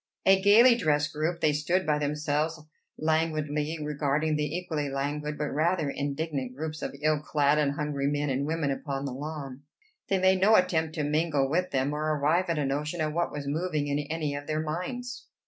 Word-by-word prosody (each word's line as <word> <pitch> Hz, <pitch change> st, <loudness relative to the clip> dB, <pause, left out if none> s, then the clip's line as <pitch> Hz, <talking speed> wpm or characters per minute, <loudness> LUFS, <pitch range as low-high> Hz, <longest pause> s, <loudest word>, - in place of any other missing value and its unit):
A 190 Hz, 0 st, +5 dB
gayly 225 Hz, +5 st, +7 dB
dressed 150 Hz, -9 st, +1 dB
group, 160 Hz, +3 st, -2 dB
they 150 Hz, -, +3 dB
stood 170 Hz, +5 st, 0 dB
by 150 Hz, -1 st, +1 dB
themselves 150 Hz, +2 st, -1 dB, 0.4 s
languidly 155 Hz, -1 st, 0 dB
regarding 150 Hz, +1 st, 0 dB
the 150 Hz, +2 st, -1 dB
equally 155 Hz, -5 st, -3 dB
languid 145 Hz, +2 st, -3 dB
but 150 Hz, 0 st, -2 dB
rather 155 Hz, 0 st, +1 dB
indignant 140 Hz, -3 st, -3 dB
groups 155 Hz, +1 st, -5 dB
of -, -, -4 dB
ill 155 Hz, -1 st, +3 dB
clad 150 Hz, -1 st, +2 dB
and 145 Hz, -2 st, +1 dB
hungry 145 Hz, -1 st, -2 dB
men 145 Hz, 0 st, 0 dB
and 135 Hz, +2 st, -1 dB
women 160 Hz, -3 st, 0 dB
upon 135 Hz, 0 st, -3 dB
the 135 Hz, -, -4 dB
lawn. 140 Hz, -1 st, -6 dB, 0.5 s
They 195 Hz, -, +2 dB
made 190 Hz, 0 st, +3 dB
no 215 Hz, +3 st, +6 dB
attempt 160 Hz, -4 st, +2 dB
to 155 Hz, -, -1 dB
mingle 150 Hz, -2 st, +1 dB
with 180 Hz, +6 st, 0 dB
them, 135 Hz, +1 st, 0 dB
or 150 Hz, -, -3 dB, 0.2 s
arrive 155 Hz, +6 st, +2 dB
at 165 Hz, -, 0 dB
a 145 Hz, -, 0 dB
notion 150 Hz, +5 st, -2 dB
of 155 Hz, -1 st, -1 dB
what 170 Hz, +1 st, 0 dB
was 145 Hz, -1 st, -5 dB
moving 155 Hz, +1 st, -1 dB
in 145 Hz, +1 st, 0 dB
any 150 Hz, 0 st, -2 dB
of 145 Hz, 0 st, -6 dB
their 155 Hz, 0 st, -1 dB
minds. 240 Hz, +11 st, -5 dB
150 Hz, 195 wpm, -28 LUFS, 145-165 Hz, 0.5 s, gayly